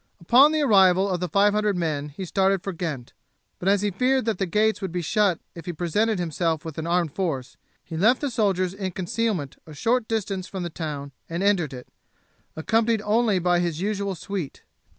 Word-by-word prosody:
Upon 255 - +6
the 310 -1 +1
arrival 190 -5 +5
of 185 -3 -1
the 180 0 -3
five 205 0 +3
hundred 210 -2 +1
men 150 -4 -2
he 170 +6 -7
started 190 +1 +1
for 195 - -4
Ghent; 155 -8 -5 0.5
but 185 - 0
as 200 0 +3
he 205 - +1
feared 255 +5 +1
that 225 -5 -1
the 195 - 0
gates 215 +5 +1
would 190 -3 -3
be 175 0 -3
shut 200 0 +2
if 170 -1 -11
he 175 - -2
presented 205 +7 0
himself 165 -2 -1
with 160 -1 -6
an 160 - -4
armed 170 -3 +1
force, 140 -9 -3 0.3
he 165 - -8
left 220 +10 +3
the 285 -3 -2
soldiers 190 -5 +1
in 190 -2 -4
concealment 185 -5 -2
a 155 - -10
short 230 - +1
distance 200 -4 -2
from 190 -2 -5
the 175 - -4
town 145 -4 -5 0.2
and 170 +3 -2
entered 195 -7 +2
it, 125 -2 -9 0.7
accompanied 225 +6 +1
only 215 -1 +2
by 175 0 +2
his 170 -3 -1
usual 200 0 -2
suite. 180 -3 -6
185 Hz, 205 wpm, -24 LUFS, 165-210 Hz, 0.7 s, Upon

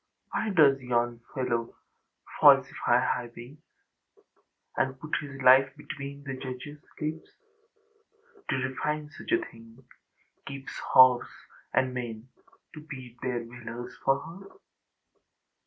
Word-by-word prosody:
Why 220 - -1
does 150 -8 +5
yon 120 -1 0
fellow 120 -3 -1 0.6
falsify - - +5
highways, 120 +3 -4 1.2
And 130 0 -1
put 150 +1 -3
his 140 -2 -9
life 130 +1 +7
between 140 -1 -8
the 135 -1 -5
judgeâs 130 +3 -7 0.2
lips, 155 +1 -4 1.2
To - - +2
refine 150 +3 -3
such - - -9
a 355 - +6
thingâkeeps 130 - -12
horse 130 -1 +7 0.4
and 130 -1 +1
men 120 -1 -6 0.4
To 155 - -9
beat 130 -6 -10
their 120 -2 -2
valours 120 0 -8
for 135 0 +3
her?... 170 +6 -11
130 Hz, 105 wpm, -28 LUFS, 120-145 Hz, 1.2 s, life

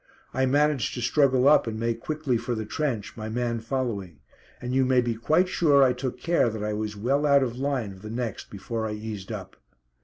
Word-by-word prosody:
I 130 0 +1
managed 145 0 +2
to 120 - -4
struggle 130 +1 +3
up 150 -4 +5
and 110 -1 -3
make 115 0 -1
quickly 155 -2 -2
for 120 +1 -2
the 110 -1 -4
trench, 120 -4 -3
my 110 -1 -6
man 120 0 -1
following; 110 - -3 0.4
and 125 +1 -4
you 135 0 +3
may 130 0 +3
be 120 -1 +1
quite 155 +11 +2
sure 145 -6 +4
I 130 -1 +4
took 125 0 -4
care 170 -8 +2
that 110 -1 -5
I 105 0 -1
was 105 0 -3
well 135 +7 +1
out 140 -1 +5
of 120 -2 -3
line 135 -7 -1
of 95 -1 -13
the 110 - -8
next 115 -1 -4
before 110 +3 -4
I 105 - -4
eased 105 -2 -6
up. - - -7
120 Hz, 220 wpm, -26 LUFS, 110-135 Hz, 0.4 s, up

